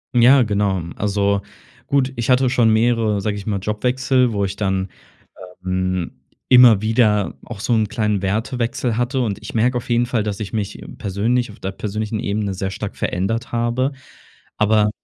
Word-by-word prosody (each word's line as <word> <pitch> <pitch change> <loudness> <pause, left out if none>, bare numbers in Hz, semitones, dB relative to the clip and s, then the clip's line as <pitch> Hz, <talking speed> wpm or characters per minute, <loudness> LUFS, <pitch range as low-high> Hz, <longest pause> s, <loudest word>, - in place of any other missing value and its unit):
Ja, 125 +2 +6
genau. 100 -3 0 0.2
Also, 100 -1 0 0.5
gut, 135 -1 +1
ich 120 -1 -3
hatte 130 +1 +4
schon 120 -3 +3
mehrere, 110 -2 +2
sage 100 +1 -2
ich 100 0 -8
mal, 105 -2 0
Jobwechsel, 125 +5 +1
wo 100 -2 0
ich 95 0 -4
dann, 95 -2 -1 0.8
ähm, 95 -1 -1 0.4
immer 125 -5 +7
wieder 110 -4 +2
auch 110 -4 -8
so 120 - -1
'n 110 -2 +2
kleinen 105 -2 0
Wertewechsel 115 +3 -1
hatte. 125 +2 0
Und 105 -5 -2
ich - - -9
merke 120 +2 +2
auf 120 - -9
jeden 120 0 +2
Fall, 120 -2 -1
dass 105 -1 -4
ich 105 - -5
mich 105 -3 -3 0.2
persönlich- 115 +5 0
auf 105 - -14
der 95 - -3
persönlichen 105 +2 -3
Ebene- 100 0 -2
sehr 95 +1 -3
stark - - -5
verändert 115 +8 -2
habe. 120 +3 0 0.7
Aber 105 0 +3
110 Hz, 170 wpm, -20 LUFS, 100-120 Hz, 0.8 s, immer